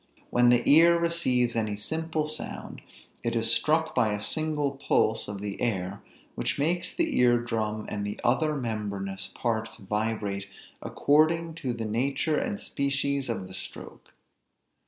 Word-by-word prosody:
When 120 0 +5
the 120 0 +3
ear 170 +3 +7
receives 130 -9 +1
any 110 -2 -1
simple 160 +6 -2
sound, 155 0 -6 0.4
it 115 0 -2
is 115 0 +4
struck 160 +4 +2
by 110 -4 +2
a 105 - -2
single 150 +3 0
pulse 115 -4 +1
of 100 -1 -6
the 100 -1 -5
air 100 -4 -2 0.3
which - - -2
makes 170 +5 0
the 330 -4 0
ear 120 -1 +5
drum 110 -2 -2
and 105 -1 -3
the 105 0 -4
other 150 +5 +2
membranous 100 -6 -4
parts 115 -2 -2
vibrate 105 -1 -2 0.3
according 160 +3 +2
to 130 -4 -1
the 115 -1 -4
nature 135 +7 0
and 235 -7 -3
species 140 -1 -1
of 105 -5 -3
the 95 - -11
stroke. - - -10
120 Hz, 150 wpm, -27 LUFS, 105-155 Hz, 0.4 s, ear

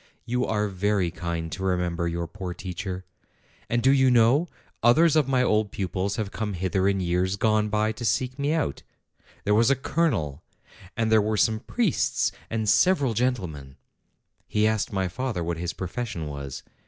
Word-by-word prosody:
You 125 +1 0
are 105 -1 0
very 95 -2 0
kind 85 -2 -4
to 95 - -6
remember 90 -2 0
your 85 0 -2
poor 90 +1 -6
teacher. 95 0 -5 0.6
And 120 0 0
do 135 - +6
you 130 -1 +4
know, 125 +7 +4 0.3
others 155 +8 +5
of 155 -4 +3
my 130 -2 +2
old 105 -3 +2
pupils 95 +1 -2
have 105 -2 -3
come 110 -2 -3
hither 95 +1 0
in 100 -1 +1
years 90 +2 0
gone 110 0 +2
by 105 +1 +1
to 110 +2 -8
seek 125 +4 0
me 140 +1 +1
out: 160 -2 -1 0.6
there 105 - +2
was 115 +3 +4
a 140 - +4
colonel, 110 - -1 0.6
and 110 -1 +1
there 110 -1 +6
were 110 +1 0
some 110 +1 +2
priests, 215 - 0 0.2
and 110 -1 -2
several 145 - +3
gentlemen." 90 - -2 0.7
He 105 0 +1
asked 110 -1 0
my 95 -2 0
father 110 -1 -3
what 85 0 -2
his 85 +1 -3
profession 95 -2 -4
was. 70 -2 -6
105 Hz, 175 wpm, -26 LUFS, 90-120 Hz, 0.7 s, do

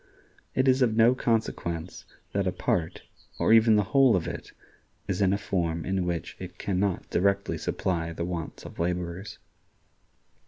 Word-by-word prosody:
It 130 +1 +2
is 130 +1 +4
of 115 -3 +3
no 115 +2 +6
consequence 90 -8 -2 0.3
that 100 -1 0
a - - +2
part, 85 -2 -1 0.3
or - - +3
even 115 -1 +6
the 105 - +3
whole 135 -5 +6
of 90 - -1
it, - - -6 0.6
is 95 -1 -1
in 95 -1 +4
a 100 - +2
form 85 -5 -2
in 95 -1 -1
which 85 -2 -3
it 90 -1 -8
can 95 -2 -1
not 100 -2 -1
directly 100 +2 +1
supply 85 -3 -2
the 85 +1 -4
wants 85 -2 -5
of - - -10
laborers. 90 +2 -3
95 Hz, 165 wpm, -27 LUFS, 85-110 Hz, 0.6 s, no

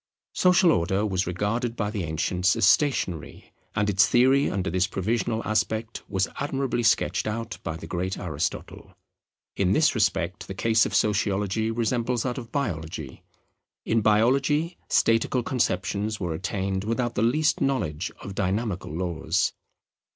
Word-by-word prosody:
Social 180 -1 +4
Order 95 - +1
was 95 -3 -1
regarded 115 +6 -1
by 105 -3 -2
the 105 -4 -3
ancients 90 +3 0
as - - +2
stationary: 95 - +1 0.2
and 105 - +1
its 100 +1 +4
theory 130 +6 +4
under 95 -2 -2
this 90 +1 +1
provisional 110 +3 -1
aspect 110 +1 -1
was 95 -1 0
admirably 135 -3 -1
sketched 110 -1 +2
out 115 +1 -4
by 80 - -4
the 80 - -9
great 90 +3 -3
Aristotle. 75 -5 -5 0.6
In 95 -1 +2
this 155 +7 +3
respect 100 -5 -1
the 95 - -6
case 110 +3 +3
of - - -4
Sociology 105 +1 +1
resembles 115 +1 0
that 125 0 -2
of 115 -2 -10
Biology. 80 - -4 0.6
In 115 0 +2
Biology 135 - +2
statical 115 +2 +2
conceptions 110 -3 -1
were 85 -3 -2
attained 95 +2 -2
without 120 +2 -1
the 105 - -1
least 145 +7 +2
knowledge 100 - -1
of 100 - -7
dynamical 95 -1 -2
laws. 85 0 -1
105 Hz, 145 wpm, -25 LUFS, 95-120 Hz, 0.6 s, Social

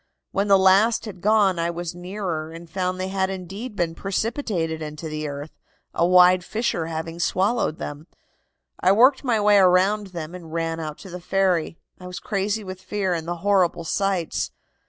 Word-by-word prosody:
When 200 +1 0
the 195 -1 +6
last 195 +5 +4
had 190 -5 -9
gone 205 -4 +3
I 170 0 0
went 170 0 -4
nearer 175 -3 -4
and 165 +1 -10
found 185 +1 -2
they 185 0 -2
had 190 0 0
indeed 195 +5 -6
been 170 -3 -1
precipitated 195 - -2
into 150 +1 -6
the 155 0 -4
earth, 145 +2 -6 0.4
a 170 - +2
wide 180 0 +6
fissure 215 -6 -2
having 165 +1 -5
swallowed 190 0 +1
them. 145 +3 -7 0.7
I 185 - +4
worked 260 +7 +5
my 240 -5 +1
way 205 -1 +5
around 190 +3 +3
them 170 -3 -7
and 170 -3 -10
ran 165 0 -2
out 155 -2 -5
to 190 - -9
the 180 0 -7
ferry. 180 -3 +1 0.2
I 180 - -9
was 180 0 -6
crazy 205 +2 -2
with 185 -1 -8
fear 190 0 -1
and 165 -1 -4
the 175 - -2
horrible 185 -4 +2
sights. 190 0 -1
185 Hz, 180 wpm, -23 LUFS, 165-200 Hz, 0.7 s, the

